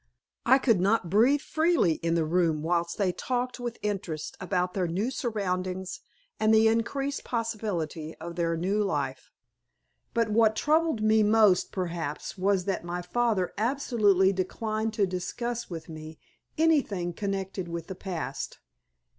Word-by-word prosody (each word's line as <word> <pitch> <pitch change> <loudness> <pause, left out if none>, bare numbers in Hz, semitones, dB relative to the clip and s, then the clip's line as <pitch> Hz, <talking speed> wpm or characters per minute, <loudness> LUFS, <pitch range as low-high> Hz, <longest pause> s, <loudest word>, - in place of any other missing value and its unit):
I 260 +2 +7
could 230 -7 +3
not 195 -3 +1
breathe 250 +8 +4
freely 315 - +2
in 165 0 +1
the 165 -2 +2
room 165 -2 +1
whilst 170 0 0
they 195 -3 +2
talked 250 +7 -2
with 240 -1 -4
interest 190 -7 -3
about 180 -1 -1
their 185 -3 0
new 195 +9 -1
surroundings 185 -6 -2 0.4
and 215 0 +3
the 220 0 +6
increased 270 +5 0
possibilities 205 -9 -3
of 170 +1 -7
their 165 -1 0
new 195 +5 +1
life. 195 - -2 0.9
But 230 -1 +2
what 220 0 +4
troubled 310 -4 +2
me 220 0 +4
most 210 -3 +4
perhaps 170 -5 -4
was 190 -1 +1
that 195 -3 -1
my 175 +1 -4
father 200 0 0
absolutely 215 -6 +3
declined 215 +4 -2
to 205 -3 +3
discuss 235 +6 -4
with 165 -3 -7
me 155 0 -9 0.4
anything 265 - +2
connected 195 -1 -3
with 170 -1 -5
the 190 - -6
past. 170 -8 -5
195 Hz, 145 wpm, -28 LUFS, 175-225 Hz, 0.9 s, I